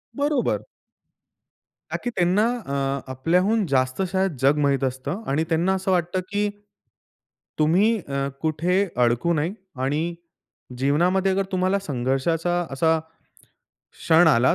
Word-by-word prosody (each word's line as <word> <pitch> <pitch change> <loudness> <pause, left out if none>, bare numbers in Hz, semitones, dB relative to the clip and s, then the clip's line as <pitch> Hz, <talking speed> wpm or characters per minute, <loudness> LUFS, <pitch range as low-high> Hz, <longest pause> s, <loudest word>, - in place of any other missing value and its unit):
बरोबर. 285 -2 0 1.3
का - - -1
की 245 - -1
त्यांना 185 +5 +3 0.2
अ, 140 - -3 0.4
आपल्याहून 180 - +1
जास्त 130 +1 0
शायद 190 -3 0
जग 140 +3 +4
माहित 140 -1 +1
असतं 135 - -3
आणि 145 +4 +1
त्यांना 170 +3 +2
असं 190 0 -1
वाटतं 175 0 0
की 205 +1 0 1.1
तुम्ही 190 +9 +3
अ, 140 0 -1
कुठे 175 +5 +1 0.2
अडकू 120 +9 +2
नये 160 +4 0 0.3
आणि 155 +5 -1 0.6
जीवनामध्ये 175 +8 +2
अगर 195 +1 0
तुम्हाला 185 +2 +1
संघर्षाचा 160 +3 -1
असा 160 +4 +2 0.9
क्षण 165 +1 +4
आला, 130 -4 +4
165 Hz, 120 wpm, -23 LUFS, 140-190 Hz, 1.3 s, जग